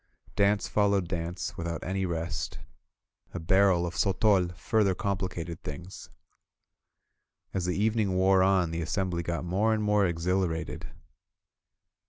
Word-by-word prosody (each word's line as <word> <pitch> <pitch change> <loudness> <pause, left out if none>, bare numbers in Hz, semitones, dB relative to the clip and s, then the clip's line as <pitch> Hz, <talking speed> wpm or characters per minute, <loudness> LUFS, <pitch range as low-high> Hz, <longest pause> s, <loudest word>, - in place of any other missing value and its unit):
Dance 100 +1 +2
followed 100 -3 +2
dance, 85 0 -4
without 85 0 -4
any 95 +1 -1
rest. 85 -1 -3 0.8
A - - -2
barrel 95 +1 +3
of 85 - -4
sotol 95 -2 +2
further 100 0 +1
complicated 90 -4 -3
things. 85 +5 -8 1.4
As 95 -3 -1
the 90 +1 -1
evening 105 -2 +1
wore 95 0 +4
on 95 -3 +3
the 85 +1 -2
assembly 90 +1 -1
got 85 +1 -3
more 105 +6 +1
and 110 - -2
more 105 -2 +3
exhilarated. 85 0 -2
95 Hz, 125 wpm, -28 LUFS, 85-100 Hz, 1.4 s, wore